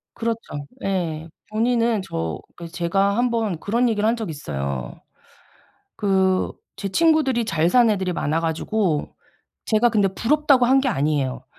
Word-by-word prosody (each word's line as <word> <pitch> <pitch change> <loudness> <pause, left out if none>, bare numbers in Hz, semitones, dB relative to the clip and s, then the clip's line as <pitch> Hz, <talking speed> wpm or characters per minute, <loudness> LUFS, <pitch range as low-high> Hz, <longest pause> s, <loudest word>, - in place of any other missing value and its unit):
그렇죠. 225 -11 -4 0.2
예. 165 -5 -2 0.2
본인은 230 0 +1
저 80 - -4 0.2
그래서 170 -1 -10
제가 195 +3 +1
1 245 +1 +3
번 220 -8 -1
그런 235 +7 +1
얘기를 215 -1 +1
한 230 - +2
적이 220 -7 -5
있어요. 70 - -5 0.9
그 190 -2 +1 0.3
제 200 - -4
친구들이 285 - +2
잘 165 -5 +1
사는 240 +2 +5
애들이 190 -3 0
많아 165 -1 -1
가지고 165 0 -1 0.5
제가 220 +2 +3
근데 205 -4 +2
부럽다고 275 +2 +3
한 265 +2 +4
게 265 - +1
아니에요. 135 - -1
200 Hz, 290 characters per minute, -22 LUFS, 160-230 Hz, 0.9 s, 사는